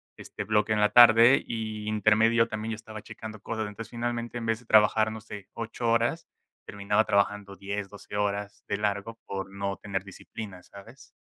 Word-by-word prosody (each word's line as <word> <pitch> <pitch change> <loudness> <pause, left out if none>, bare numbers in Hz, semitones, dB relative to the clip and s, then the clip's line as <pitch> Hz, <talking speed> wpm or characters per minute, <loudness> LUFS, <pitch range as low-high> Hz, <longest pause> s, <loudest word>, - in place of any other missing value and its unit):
este, 105 - -7
bloque 105 +1 +1
en 110 - +2
la 105 - +4
tarde, 120 +2 +8
y 110 -2 -5
intermedio 110 +2 +3
también 110 0 -4
estaba 110 -1 -9
checando 110 -1 -9
cosas. 110 -1 -3
Entonces, 105 +2 -8
finalmente, 120 0 -3
en 115 - -5
vez 115 0 0
de 125 - -20
trabajar, 110 0 +4
no 110 - -6
sé, 105 -2 -10
8 115 +1 -3
horas, 120 +8 +1 0.4
terminaba 105 +1 0
trabajando 100 -1 0
10, 100 0 -5
12 100 0 -10
horas 100 0 -2
de - - 0
largo 105 +2 -2
por 95 0 -5
no 100 0 -3
tener 95 -1 -4
disciplina, 95 0 -9
¿sabes? 115 +9 -14
110 Hz, 175 wpm, -27 LUFS, 100-115 Hz, 0.4 s, tarde